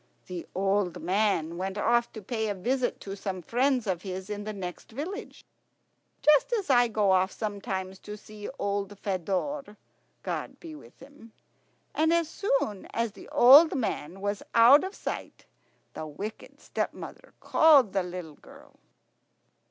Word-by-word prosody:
The 180 -2 -7
old 195 -1 0
man 185 -4 0
went 190 +2 -3
off 235 +3 +2
to 220 - -9
pay 220 +1 -2
a 205 - -2
visit 245 +6 -1
to 195 0 -6
some 190 -2 -5
friends 250 - +1
of 185 -4 -1
his 190 +1 -6
in 205 0 -5
the 215 - -3
next 185 -2 -7
village, 345 - -7 0.8
just 300 - +5
as 405 -10 0
I 245 -1 +5
go 215 -3 +2
off 190 +1 +3
sometimes 195 -3 -4
to 210 0 -8
see 210 0 -9
old 200 0 -2
Fedor, 205 - -3 0.5
God - - -4
be 330 -2 -9
with 300 - -14
him. 265 -5 -15 0.6
And 320 +1 +2
as 335 -1 +2
soon 275 - -1
as 230 -1 0
the - - -13
old 285 +7 +8
man 195 - -3
was 205 0 -2
out 240 +7 +8
of 380 +2 -5
sight - - -6 0.5
the 155 - -6
wicked 200 +9 -8
stepmother - - -6
called 285 -10 +5
the 195 - +2
little 180 -3 -7
girl. - - -17
210 Hz, 150 wpm, -28 LUFS, 190-260 Hz, 0.8 s, old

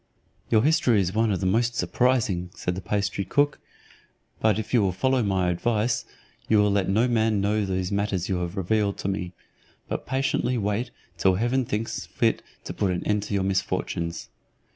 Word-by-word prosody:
"Your 110 -1 +4
history 130 -7 +3
is 95 -1 0
one 110 0 +2
of 95 - -1
the - - -1
most 115 +5 +1
surprising," 115 -10 +1
said 90 - -2
the 95 - -5
pastry 100 +1 -1
cook; 145 +9 +1 0.8
"but 110 -2 +3
if 110 - -5
you 120 - +5
will 95 -2 +2
follow 130 +7 +1
my 95 -4 +1
advice, 115 +6 0 0.4
you 110 - +5
will 105 0 +4
let 100 -2 +1
no 110 +6 +3
man 110 -3 +2
know 105 +2 +1
those 95 -1 -2
matters 100 -3 -1
you 95 - 0
have 90 +2 -4
revealed 100 +1 0
to - - -4
me, 90 -2 -3 0.5
but - - -4
patiently 130 -1 0
wait 105 +3 -1 0.3
till 95 -1 +4
heaven 120 +5 +1
thinks 110 +1 -3
fit - - +1 0.2
to - - -5
put 100 - 0
an 90 -1 -2
end 105 0 +1
to 100 - -3
your 95 - +1
misfortunes. 95 -3 -2
105 Hz, 185 wpm, -25 LUFS, 95-115 Hz, 0.8 s, you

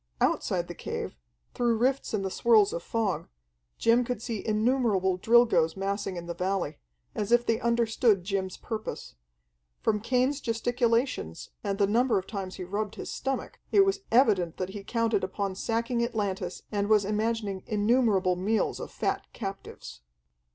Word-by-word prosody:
Outside - - +1
the - - -6
cave, - - -5 0.4
through 235 -2 +1
rifts 260 +4 +1
in 210 -3 -1
the 190 - -2
swirls 215 -3 +4
of 170 - -3
fog, 195 -6 -1 0.5
Jim 235 +2 +4
could 245 -2 -3
see 225 -2 -4
innumerable 215 -4 +2
Drilgoes 210 -8 +4
massing 195 0 -2
in 170 - -6
the 170 - -4
valley, 185 - -2 0.3
as 210 +1 -3
if 240 0 +5
they 225 - +1
understood 230 -3 +2
Jim's 190 -1 -2
purpose. 220 -2 -6 0.7
From 210 -1 +1
Cain's 255 +5 +1
gesticulations, 235 - 0
and 200 -1 -1
the 200 - +4
number 235 +4 +2
of 190 - -2
times 190 -3 -5
he 185 - -6
rubbed 205 +3 -3
his - - -6
stomach, 270 0 -3
it 395 -1 +6
was 390 0 0
evident 205 - +3
that 185 0 -3
he 200 +1 -7
counted 230 -2 0
upon 195 +1 -2
sacking 230 +4 -1
Atlantis 200 -6 -3
and 205 -1 0
was 210 -2 +4
imagining 210 -2 -1
innumerable 210 -4 +2
meals 205 +5 0
of - - -6
fat - - -2
captives. 195 - -7
215 Hz, 160 wpm, -28 LUFS, 195-235 Hz, 0.7 s, it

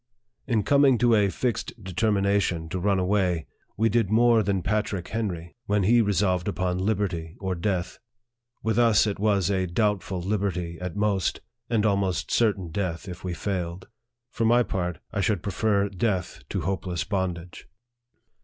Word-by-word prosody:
In 115 -5 +1
coming 140 -1 +4
to 120 0 +3
a 105 -2 +4
fixed 120 0 -3
determination 100 -3 0
to 90 +3 -3
run 100 +1 +2
away, 90 -3 +1 0.3
we 115 - +3
did 115 -2 +1
more 115 +1 +5
than 100 -4 -1
Patrick 100 -3 -1
Henry, 90 -7 -4
when 105 -1 +2
he 115 +5 +5
resolved 95 -3 +1
upon 90 -2 -1
86 - - -3
NARRATIVE - - +4
OF 110 - 0
THE 105 - 0 0.2
liberty 80 +2 -14
or 95 -1 -2
death. 90 0 -2 0.6
With 110 +1 +1
us 115 -3 +5
it 100 -2 -2
was 100 -3 +2
a 95 -1 0
doubtful 95 -1 0
liberty 90 -3 -2
at 90 -3 -4
most, 100 -3 0 0.3
and 110 -2 +1
almost 100 -5 0
certain 100 -6 +1
death 90 0 -3
if 90 -1 -8
we 90 -2 -3
failed. 90 -1 -4 0.4
For 115 - -2
my 120 +2 +5
part, 90 -6 -3 0.2
I 100 - 0
should 95 -1 0
prefer 100 0 +1
death 95 - -2
to 95 - -2
hopeless 90 0 -2
bondage. 90 -3 -4
100 Hz, 170 wpm, -26 LUFS, 90-105 Hz, 0.6 s, more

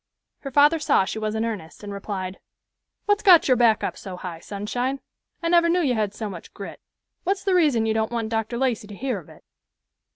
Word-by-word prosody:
Her 275 - -6
father 295 +4 +5
saw 285 -9 +3
she 220 - -4
was 215 0 -2
in 220 +1 0
earnest, 205 -6 -6
and 205 -1 -6
replied, 195 -2 -5 0.7
"What's 410 0 +2
got 365 -6 +7
your 255 - +5
back 235 -3 +3
up - - -2
so 185 -2 -8
high, 175 -3 -7
Sunshine? 245 +8 -3 0.4
I - - +1
never 340 0 +5
knew 355 +1 +3
you 265 -4 +2
had 210 -3 -1
so 220 - -4
much 185 -4 -9
grit. 200 - -8 0.4
What's 390 +1 -1
the 390 - +1
reason 295 -11 +3
you 220 - +1
don't 220 0 0
want 230 -2 -2
Dr. 225 +1 -2
Lacey 240 -5 0
to 205 - -9
hear 250 -1 -2
of 165 - -16
it?" - - -16
225 Hz, 220 wpm, -24 LUFS, 205-285 Hz, 0.7 s, got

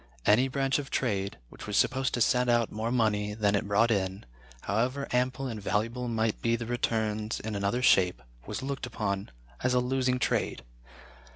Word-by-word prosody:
Any 115 +6 +5
branch 135 +1 0
of 140 -2 -6
trade 100 -6 -1
which - - -11
was 105 - 0
supposed 130 0 +2
to 120 - -2
send 125 +2 +3
out 120 -1 +2
more 110 +2 -2
money 105 -4 +1
than 105 -2 +2
it 100 0 0
brought 105 +3 +3
in, 95 -2 -1 0.4
however 130 +7 -1
ample 125 +2 0
and 115 -5 -4
valuable 115 +5 -1
might 110 -2 -1
be 115 0 +2
the 115 0 -4
returns 110 -2 -1
in 110 0 -5
another 100 +5 0
shape, 90 - +4 0.2
was - - -4
looked 135 -2 -3
upon 100 -4 -3 0.3
as 125 0 +2
a - - +5
losing 125 0 +1
trade. 110 - -1
115 Hz, 180 wpm, -29 LUFS, 105-125 Hz, 0.4 s, Any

